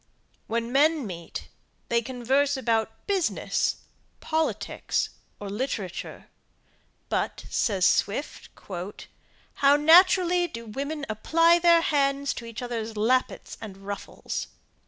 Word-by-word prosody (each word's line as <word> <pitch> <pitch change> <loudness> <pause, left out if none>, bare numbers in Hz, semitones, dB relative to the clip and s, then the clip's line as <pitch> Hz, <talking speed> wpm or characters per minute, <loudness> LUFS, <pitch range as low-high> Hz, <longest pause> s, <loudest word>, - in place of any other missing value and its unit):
When 230 +1 -2
men 295 +1 +3
meet 170 -4 -7 0.4
they 235 0 +2
converse 265 +4 0
about 225 -3 -1
business, 390 -4 0 0.4
politics, 320 0 -1 0.3
or 205 - -6
literature; 205 -3 -4 0.8
but, - - -2
says 195 -5 +1
Swift, 225 +9 0 1.0
"how 280 +1 +5
naturally 355 +3 +5
do 230 -7 -8
women 280 +6 -4
apply 330 +11 +3
their 340 -1 +5
hands 280 -2 +1
to 235 - -8
each 230 +1 -7
others 225 -2 -4
lappets 255 +5 0
and 205 -4 -8
ruffles." 200 +1 -5
255 Hz, 105 wpm, -26 LUFS, 220-310 Hz, 1.0 s, how